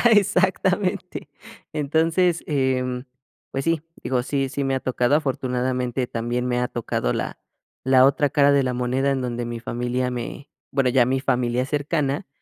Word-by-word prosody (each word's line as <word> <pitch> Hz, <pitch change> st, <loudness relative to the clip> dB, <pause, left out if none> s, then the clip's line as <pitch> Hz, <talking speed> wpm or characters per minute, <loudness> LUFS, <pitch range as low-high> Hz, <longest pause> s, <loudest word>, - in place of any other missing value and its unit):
Exactamente. 190 Hz, -1 st, +1 dB, 0.4 s
Entonces, 160 Hz, +4 st, +1 dB
em, 130 Hz, -3 st, 0 dB, 0.5 s
pues 135 Hz, 0 st, -3 dB
sí, 165 Hz, -2 st, +1 dB, 0.2 s
digo, 125 Hz, -2 st, 0 dB
sí 135 Hz, 0 st, -1 dB
sí 140 Hz, +1 st, -2 dB
me 135 Hz, 0 st, 0 dB
ha -, -, 0 dB
tocado, 130 Hz, +1 st, +1 dB
afortunadamente 125 Hz, -3 st, -1 dB
también 120 Hz, +2 st, -2 dB
me 125 Hz, 0 st, 0 dB
ha 125 Hz, -, 0 dB
tocado 110 Hz, -, -2 dB
la -, -, -4 dB, 0.5 s
la 130 Hz, 0 st, +6 dB
otra 140 Hz, +1 st, +3 dB
cara 145 Hz, 0 st, +4 dB
de 140 Hz, -1 st, +4 dB
la 125 Hz, -1 st, -1 dB
moneda, 125 Hz, +2 st, 0 dB
en 135 Hz, -1 st, 0 dB
donde 120 Hz, -1 st, -3 dB
mi 120 Hz, 0 st, -5 dB
familia 125 Hz, +2 st, -2 dB
me 125 Hz, +4 st, -6 dB, 0.2 s
bueno, 135 Hz, -2 st, +2 dB
ya 125 Hz, -1 st, +4 dB
mi 130 Hz, +2 st, +1 dB
familia 125 Hz, -1 st, 0 dB
cercana. 145 Hz, 0 st, -1 dB
130 Hz, 160 wpm, -23 LUFS, 125-145 Hz, 0.5 s, la